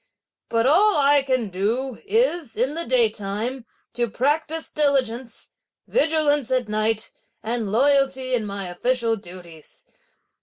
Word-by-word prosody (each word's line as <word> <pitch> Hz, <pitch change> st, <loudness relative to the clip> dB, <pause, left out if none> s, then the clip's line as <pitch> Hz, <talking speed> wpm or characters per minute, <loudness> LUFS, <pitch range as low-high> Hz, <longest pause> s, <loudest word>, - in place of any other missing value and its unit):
But 230 Hz, 0 st, +1 dB
all 380 Hz, +9 st, +4 dB
I 285 Hz, 0 st, +4 dB
can 255 Hz, -5 st, -1 dB
do 225 Hz, +7 st, -2 dB
is, 390 Hz, -, +1 dB
in 255 Hz, +5 st, 0 dB
the 335 Hz, +2 st, -4 dB
daytime, 230 Hz, +1 st, -1 dB, 0.3 s
to 240 Hz, -1 st, -1 dB
practise 310 Hz, +7 st, -1 dB
diligence, 260 Hz, -5 st, -1 dB, 0.4 s
vigilance 305 Hz, -, +2 dB
at 255 Hz, -3 st, 0 dB
night, 215 Hz, +1 st, -1 dB, 0.3 s
and 225 Hz, -2 st, -3 dB
loyalty 265 Hz, +1 st, +2 dB
in 240 Hz, -3 st, +1 dB
my 200 Hz, -1 st, -5 dB
official 230 Hz, +5 st, 0 dB
duties. 175 Hz, -5 st, -12 dB
250 Hz, 120 wpm, -22 LUFS, 220-285 Hz, 0.4 s, all